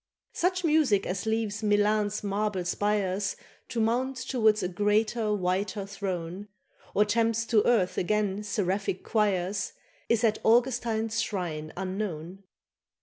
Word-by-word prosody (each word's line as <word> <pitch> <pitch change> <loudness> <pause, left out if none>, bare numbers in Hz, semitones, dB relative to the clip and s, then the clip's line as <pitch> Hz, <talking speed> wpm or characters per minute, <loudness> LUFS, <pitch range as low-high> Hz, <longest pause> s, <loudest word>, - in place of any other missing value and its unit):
Such 365 +1 0
music 300 - +3
as 185 +4 -3
leaves 220 -1 -1
Milan's 210 0 +2
marble 200 -2 -1
spires 200 +1 0 0.3
To 235 - -3
mount 245 +4 +1
towards 220 -5 +2
a - - +1
greater 210 +4 +1
whiter 195 +1 -1
throne, 195 -1 -5 0.5
Or 210 - +5
tempts 225 +1 +1
to 225 -2 +3
earth 200 -7 +2
again 205 +1 0
seraphic 195 -2 -1
choirs, 205 - 0 0.4
Is 230 -1 +2
at 215 -2 +2
Augustine's 230 -2 +2
shrine 165 -8 -3
unknown. 185 -2 -4
210 Hz, 120 wpm, -28 LUFS, 190-225 Hz, 0.5 s, Or